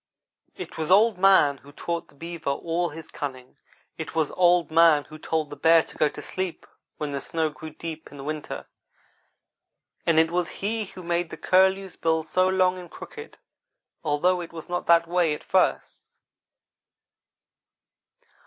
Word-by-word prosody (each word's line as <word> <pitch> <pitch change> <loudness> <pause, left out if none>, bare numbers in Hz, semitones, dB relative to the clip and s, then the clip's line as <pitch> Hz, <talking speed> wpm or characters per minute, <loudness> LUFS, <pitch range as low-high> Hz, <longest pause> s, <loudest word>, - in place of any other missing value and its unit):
It - - -8
was 160 - -2
Old 205 +1 +5
man 185 -7 +5
who 140 +1 -16
taught 170 +3 -4
the - - -23
beaver 165 0 -5
all 165 +4 -1
his 160 +1 -10
cunning. 130 -3 -7 0.4
It - - -6
was 160 -3 +1
Old 175 -3 +3
man 165 -2 +5
who 155 +1 -12
told 155 -2 -2
the - - -6
bear 165 +1 +5
to - - -14
go 155 - +2
to - - -9
sleep 185 -2 -4 0.3
when 150 -1 -3
the 140 -1 -3
snow 160 -2 -1
grew 155 +1 -9
deep 160 +1 -8
in 140 -1 -9
winter, 155 0 -5 1.4
and 165 -2 +2
it 160 +1 +4
was 175 -1 0 0.2
he 220 +1 -1
who 185 -1 -11
made 170 0 -1
the - - -8
curlew's 190 +1 +2
bill 160 -1 +1
so 185 +4 +2
long 185 -1 +2
and 175 -1 -10
crooked, 450 0 -10 0.7
although 175 +4 +1
it 170 - -8
was 165 -1 -9
not 175 0 -3
that 170 0 +5
way 170 -3 +2
at - - -12
first. - - 0
165 Hz, 165 wpm, -25 LUFS, 155-180 Hz, 1.4 s, Old